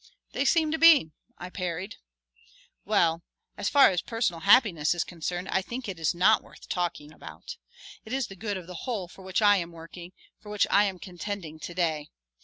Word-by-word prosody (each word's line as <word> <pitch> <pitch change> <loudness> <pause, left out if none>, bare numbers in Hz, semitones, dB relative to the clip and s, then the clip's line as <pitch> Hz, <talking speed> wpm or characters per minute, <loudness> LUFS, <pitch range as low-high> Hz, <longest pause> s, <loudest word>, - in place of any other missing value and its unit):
"They - - -1
seem 320 -2 +3
to 320 - -1
be," 320 - +6 0.3
I 180 +1 -8
parried. 180 +4 -5 0.9
"Well, 170 -5 +2 0.3
as - - -2
far 280 -7 +6
as 180 -1 -1
personal 225 -7 -2
happiness 175 - +4
is 175 - 0
concerned 175 +2 -5
I 190 - +1
think 240 +5 -6
it 185 -4 -6
is 160 +1 0
not 190 +5 +4
worth - - -16
talking 170 -4 -3
about. - - -10 0.5
It - - -12
is 265 -1 0
the 195 - -11
good 205 +1 -4
of 180 - -9
the 180 +4 -9
whole 205 -7 -2
for 190 - -15
which 190 +3 -1
I 205 -1 +6
am 170 -2 -4
working, 170 +2 -11 0.3
for 210 - -13
which 210 -1 +2
I 205 - +5
am 195 -2 -3
contending 175 -3 -7
to 175 - -8
day. 160 -4 -1
185 Hz, 200 wpm, -27 LUFS, 170-210 Hz, 0.9 s, be